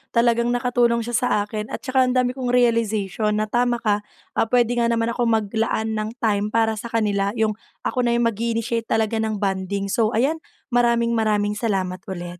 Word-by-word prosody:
Talagang 235 Hz, 0 st, +3 dB
nakatulong 240 Hz, -1 st, +1 dB
siya 240 Hz, -, -5 dB
sa 245 Hz, +2 st, +1 dB, 0.2 s
akin 210 Hz, 0 st, -5 dB
at -, -, -7 dB
saka 260 Hz, -1 st, +2 dB
ang 250 Hz, -, 0 dB
dami 250 Hz, -1 st, +2 dB
kong 250 Hz, -1 st, -1 dB
realization 220 Hz, -3 st, +1 dB
na 215 Hz, 0 st, -2 dB
tama 240 Hz, -1 st, +1 dB
ka, 210 Hz, -1 st, +2 dB, 0.3 s
ah, -, -, 0 dB
puwede 240 Hz, 0 st, +2 dB
nga 235 Hz, -, +2 dB
naman 230 Hz, 0 st, +1 dB
akong 240 Hz, 0 st, 0 dB
maglaan 220 Hz, 0 st, 0 dB
ng 220 Hz, +1 st, -3 dB
time 205 Hz, -2 st, +1 dB
para 220 Hz, 0 st, +1 dB
sa 235 Hz, -, -6 dB
kanila, 205 Hz, -2 st, 0 dB
'yong 220 Hz, -2 st, +1 dB, 0.3 s
ako 255 Hz, -, -2 dB
na 235 Hz, -, +2 dB
'yong 240 Hz, -, +2 dB
mag-i-initiate 230 Hz, +1 st, -2 dB
talaga 220 Hz, 0 st, 0 dB
ng 220 Hz, -1 st, -1 dB
bonding. 195 Hz, 0 st, -2 dB
So 220 Hz, +1 st, +1 dB
ayan, 290 Hz, +8 st, +1 dB, 0.3 s
maraming-maraming 230 Hz, -3 st, +1 dB
salamat 190 Hz, -5 st, -1 dB
ulit. 175 Hz, -2 st, -6 dB
225 Hz, 185 wpm, -22 LUFS, 210-240 Hz, 0.3 s, Talagang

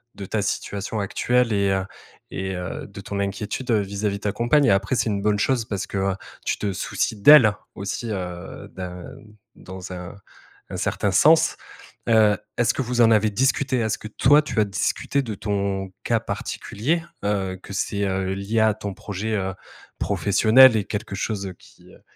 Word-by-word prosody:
de 100 Hz, -, -7 dB
ta 105 Hz, +2 st, -1 dB
situation 100 Hz, +1 st, -3 dB
actuelle 120 Hz, +3 st, +1 dB
et 100 Hz, -1 st, +2 dB
heu 95 Hz, 0 st, 0 dB, 0.5 s
et 95 Hz, 0 st, -3 dB
heu, 90 Hz, +1 st, -5 dB
de 100 Hz, 0 st, -10 dB
ton 100 Hz, 0 st, -5 dB
inquiétude, 105 Hz, +5 st, -3 dB
heu, 110 Hz, -, +4 dB
vis-à-vis 100 Hz, +1 st, -2 dB
de -, -, -15 dB
ta 105 Hz, -, 0 dB
compagne 135 Hz, +5 st, +3 dB
et -, -, +4 dB
après 100 Hz, +7 st, +1 dB
c'est 115 Hz, -, +1 dB
une 100 Hz, -1 st, -1 dB
bonne 105 Hz, 0 st, +1 dB
chose 125 Hz, 0 st, +1 dB
parce 100 Hz, -3 st, -4 dB
que 95 Hz, -1 st, -1 dB, 0.3 s
tu -, -, 0 dB
te 100 Hz, -2 st, -1 dB
soucies 110 Hz, -, -2 dB
d'elle 120 Hz, -4 st, +8 dB, 0.2 s
aussi, 100 Hz, +4 st, -4 dB
heu, 90 Hz, -3 st, -6 dB
d'un 90 Hz, -1 st, -7 dB, 0.5 s
dans 95 Hz, 0 st, -9 dB
un 90 Hz, +1 st, -8 dB, 0.6 s
un -, -, -4 dB
certain 100 Hz, -, -1 dB
sens. 160 Hz, -, +5 dB, 0.5 s
Heu, 110 Hz, -3 st, +5 dB, 0.2 s
est-ce 120 Hz, -2 st, +2 dB
que -, -, -2 dB
vous 120 Hz, 0 st, 0 dB
en 115 Hz, -, +6 dB
avez 110 Hz, 0 st, +4 dB
discuté? 130 Hz, +3 st, +1 dB
Est-ce 110 Hz, -1 st, 0 dB
que -, -, -9 dB
toi, 145 Hz, +7 st, +4 dB
tu 135 Hz, -, -2 dB
as 105 Hz, -, +4 dB
discuté 100 Hz, +7 st, -1 dB
de 115 Hz, -, -4 dB
ton 100 Hz, -1 st, -2 dB
cas -, -, +1 dB
particulier? 160 Hz, +11 st, -3 dB, 0.2 s
Heu, 95 Hz, -2 st, -1 dB
que 100 Hz, -, -10 dB
c'est, 100 Hz, +1 st, -1 dB
heu, 95 Hz, 0 st, -1 dB
lié 100 Hz, +4 st, -1 dB
à 110 Hz, -1 st, +4 dB
ton 100 Hz, -2 st, -5 dB
projet, 105 Hz, +3 st, -4 dB
heu, 95 Hz, -1 st, -2 dB, 0.5 s
professionnel 115 Hz, +5 st, +5 dB
et 105 Hz, -, -1 dB
quelque 105 Hz, -2 st, -4 dB
chose 100 Hz, -2 st, -3 dB
qui, -, -, -19 dB
heu, -, -, -18 dB
100 Hz, 185 wpm, -23 LUFS, 95-115 Hz, 0.6 s, d'elle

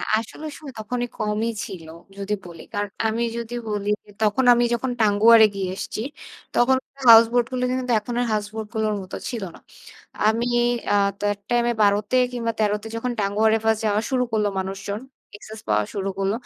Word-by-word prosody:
আ -, -, -5 dB, 0.2 s
আসলে 230 Hz, +7 st, -7 dB
সময় 290 Hz, -4 st, -10 dB
তখনই 245 Hz, +3 st, -3 dB
কমই 215 Hz, +2 st, -1 dB
ছিল 170 Hz, -4 st, -8 dB, 0.3 s
যদি 200 Hz, +1 st, -2 dB
বলি। 170 Hz, -2 st, -10 dB, 0.5 s
আমি 225 Hz, +2 st, -1 dB
যদি 235 Hz, 0 st, -5 dB, 0.2 s
বলি 205 Hz, 0 st, -1 dB
যে -, -, -17 dB
তখন 215 Hz, +5 st, +2 dB
আমি 240 Hz, 0 st, +2 dB
যখন 250 Hz, +2 st, -2 dB
টাঙ্গুয়ারে 220 Hz, +1 st, +7 dB
গিয়ে 195 Hz, -2 st, -2 dB
এসছি, 210 Hz, -, -5 dB, 0.6 s
তখন 260 Hz, +2 st, +4 dB, 0.2 s
কার 275 Hz, -, -14 dB
হাউস 225 Hz, +1 st, +9 dB
বোট 245 Hz, 0 st, +3 dB
গুলো 250 Hz, 0 st, -1 dB
কিন্তু 255 Hz, -1 st, -1 dB
এখন 235 Hz, +3 st, -6 dB
এর 245 Hz, -, +1 dB
হাউস 210 Hz, -1 st, 0 dB
বোট 220 Hz, -1 st, -4 dB
গুলোর 215 Hz, -1 st, 0 dB
মত 185 Hz, 0 st, -11 dB, 0.2 s
ছিল 235 Hz, -4 st, -4 dB
না। -, -, -13 dB, 0.7 s
আমি 230 Hz, +2 st, +1 dB, 0.5 s
আ -, -, +5 dB, 0.2 s
তো -, -, -15 dB
অ্যাট 205 Hz, 0 st, -4 dB
টাইম 240 Hz, 0 st, +2 dB
এ -, -, -6 dB
১২-তে 205 Hz, +4 st, +2 dB, 0.2 s
কিংবা 230 Hz, -2 st, -2 dB
১৩-তে 210 Hz, 0 st, 0 dB
যখন 245 Hz, +2 st, -2 dB
টাঙ্গুয়ারে 215 Hz, +2 st, +2 dB
ফার্স্ট 220 Hz, -1 st, +2 dB
যাওয়া 210 Hz, 0 st, +2 dB
শুরু 255 Hz, -2 st, +2 dB
করল 215 Hz, -1 st, +1 dB
মানুষজন। 195 Hz, +2 st, -4 dB, 0.4 s
এক্সেস 215 Hz, +1 st, -11 dB
পাওয়া 105 Hz, 0 st, +2 dB
শুরু 195 Hz, -1 st, -2 dB
করল। 195 Hz, 0 st, +1 dB
220 Hz, 190 wpm, -23 LUFS, 205-235 Hz, 0.7 s, হাউস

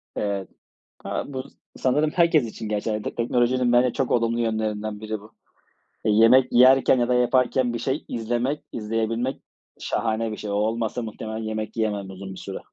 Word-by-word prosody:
Evet. 100 Hz, -2 st, -2 dB, 0.5 s
Ha, -, -, -2 dB
bu 130 Hz, -2 st, -5 dB, 0.3 s
sanırım 150 Hz, +4 st, +1 dB
herkes 165 Hz, -6 st, +3 dB
için 110 Hz, -1 st, -7 dB
geçerli. 105 Hz, 0 st, -2 dB
Teknolojinin 120 Hz, +1 st, +1 dB
bence 125 Hz, 0 st, +4 dB
çok 135 Hz, -, -1 dB
olumlu 115 Hz, 0 st, +1 dB
yönlerinden 110 Hz, -2 st, -2 dB
biri 110 Hz, -1 st, -4 dB
bu. 105 Hz, +2 st, -16 dB, 0.7 s
Yemek 115 Hz, +4 st, +5 dB
yerken 130 Hz, +1 st, +6 dB
ya 120 Hz, 0 st, +1 dB
da 125 Hz, -, +2 dB
yaparken 125 Hz, 0 st, +2 dB
bir -, -, -2 dB
şey 135 Hz, +5 st, -2 dB
izlemek, 120 Hz, +5 st, -2 dB
izleyebilmek 115 Hz, +3 st, -2 dB, 0.4 s
şahane 110 Hz, -1 st, -1 dB
bir -, -, -5 dB
şey. 105 Hz, -, -6 dB
O -, -, -1 dB
olmasa 110 Hz, +3 st, -1 dB
muhtemelen 110 Hz, 0 st, -6 dB
yemek 110 Hz, 0 st, -4 dB
yiyemem 105 Hz, -3 st, -1 dB
uzun 95 Hz, 0 st, -8 dB
bir -, -, -10 dB
süre. -, -, -6 dB
115 Hz, 160 wpm, -24 LUFS, 110-125 Hz, 0.7 s, yerken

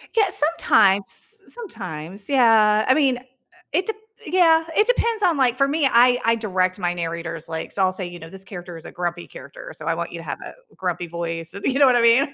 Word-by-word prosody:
Yeah, 435 Hz, -2 st, +4 dB
sometimes, 295 Hz, -, +4 dB
s 440 Hz, -, -6 dB
sometimes. 200 Hz, -, -8 dB
Yeah, 220 Hz, -5 st, +4 dB
I 260 Hz, -, +5 dB
mean, 270 Hz, -3 st, +2 dB
uh, -, -, -12 dB, 0.5 s
it 360 Hz, +4 st, +1 dB
de 445 Hz, -, 0 dB, 0.3 s
yeah, 330 Hz, -3 st, +4 dB
it 425 Hz, +2 st, +3 dB
depends 465 Hz, -3 st, +1 dB
on, 345 Hz, -6 st, +2 dB
like, 250 Hz, -3 st, +2 dB
for 275 Hz, 0 st, +3 dB
me, 290 Hz, 0 st, +1 dB
I 245 Hz, +1 st, +5 dB
I 230 Hz, 0 st, +3 dB
direct 185 Hz, -4 st, -1 dB
my 175 Hz, -1 st, -1 dB
narrators, 165 Hz, -1 st, -5 dB
like, 160 Hz, 0 st, -5 dB
so 195 Hz, -, 0 dB
I'll 185 Hz, -, +2 dB
say, 185 Hz, -1 st, -2 dB
you 175 Hz, 0 st, -10 dB
know, 165 Hz, 0 st, -11 dB
"This 190 Hz, +2 st, -9 dB
character 180 Hz, -3 st, -9 dB
is 165 Hz, -, -13 dB
a -, -, -9 dB
grumpy 175 Hz, -1 st, -4 dB
character, 140 Hz, +2 st, -11 dB
so 155 Hz, -, -7 dB
I 165 Hz, -, +1 dB
want 170 Hz, +1 st, -5 dB
you 170 Hz, -, -7 dB
to 165 Hz, -, -9 dB
have -, -, -6 dB
a -, -, -9 dB, 0.2 s
grumpy 180 Hz, -2 st, -3 dB
voice, 165 Hz, 0 st, -4 dB
and" 200 Hz, -, -8 dB
you 270 Hz, -, 0 dB
know 285 Hz, -, +7 dB
what 255 Hz, -2 st, +4 dB
I 240 Hz, -, +3 dB
mean? 245 Hz, +5 st, +3 dB
210 Hz, 240 wpm, -22 LUFS, 175-275 Hz, 0.5 s, know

